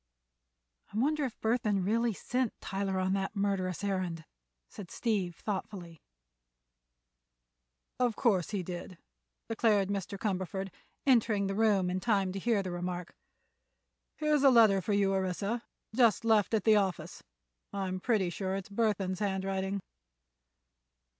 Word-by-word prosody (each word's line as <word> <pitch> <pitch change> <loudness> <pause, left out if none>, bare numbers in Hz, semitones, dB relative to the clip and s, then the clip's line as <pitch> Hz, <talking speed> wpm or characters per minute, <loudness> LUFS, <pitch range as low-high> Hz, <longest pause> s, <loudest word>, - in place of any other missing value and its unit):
"I 210 - -5
wonder 295 +4 +1
if 250 - -6
Burthon 220 -4 +1
really 230 +3 +2
sent 250 +3 -2
Tyler 195 -1 -2
on 185 0 +1
that 195 +2 -2
murderous 195 -3 -1
errand," 185 -5 -2 0.4
said 195 -5 -10
Steve, 195 -7 -1
thoughtfully. 185 -5 -5 2.0
"Of 245 -3 +2
course 200 -9 +2
he 200 -4 -2
did!" 175 0 -7 0.5
declared 215 -4 +2
Mr. 200 0 -3
Cumberford, 190 -2 -3 0.3
entering 225 -6 +3
the 195 - -1
room 205 -3 +3
in 185 - -1
time 195 -3 +1
to 195 - -4
hear 215 -1 +1
the 185 - -4
remark. 175 0 -4 1.0
"Here's 305 -2 +2
a 275 - +7
letter 220 -6 +6
for 205 - -1
you, 200 -1 +2
Orissa, 195 +4 -1 0.3
just 230 -2 +3
left 220 -1 +3
at 210 - 0
the 220 -1 +6
office, 195 -3 -2 0.5
and 200 -1 -3
I'm 185 0 -3
pretty 195 -4 +1
sure 190 +2 -2
it's 195 0 -5
Burthon's 200 -3 0
handwriting." 195 -1 -1
200 Hz, 135 wpm, -31 LUFS, 185-220 Hz, 2.0 s, a